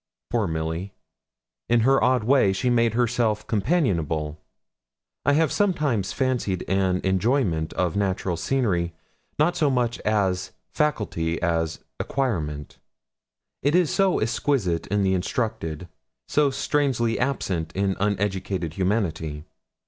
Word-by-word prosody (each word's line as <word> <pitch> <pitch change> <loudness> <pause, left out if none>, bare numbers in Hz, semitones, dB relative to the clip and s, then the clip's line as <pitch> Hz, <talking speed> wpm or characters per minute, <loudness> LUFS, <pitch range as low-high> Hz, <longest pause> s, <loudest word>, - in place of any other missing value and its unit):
Poor 115 -4 +1
Milly! 80 +4 -3 0.8
In 120 0 +4
her 135 +4 +4
odd 125 -1 +3
way 125 -5 +4
she 95 +6 0
made 115 -2 +2
herself 115 -3 +1
companionable. 90 - 0 0.9
I 140 - +5
have 155 0 +3
sometimes 150 - +1
fancied 125 -8 -1
an 95 -1 +1
enjoyment 95 - +1
of 90 -3 0
natural 95 -2 0
scenery 85 -4 0 0.4
not 165 +4 +2
so 150 -3 +2
much 120 -3 0
a 100 -4 +2 0.4
faculty 105 - -1
as 85 -2 0
an - - -33 0.2
acquirement. 80 - -2 0.8
It 145 +4 +2
is 180 -4 +3
so 195 -2 +3
exquisite 110 -6 0
in 100 0 +1
the 95 0 +2
instructed, 90 -4 -2 0.4
so 145 -1 +3
strangely 135 -5 0
absent 95 -12 -1
in 95 0 +1
uneducated 95 -4 -1
humanity. 85 -6 -1
105 Hz, 120 wpm, -24 LUFS, 90-130 Hz, 0.9 s, I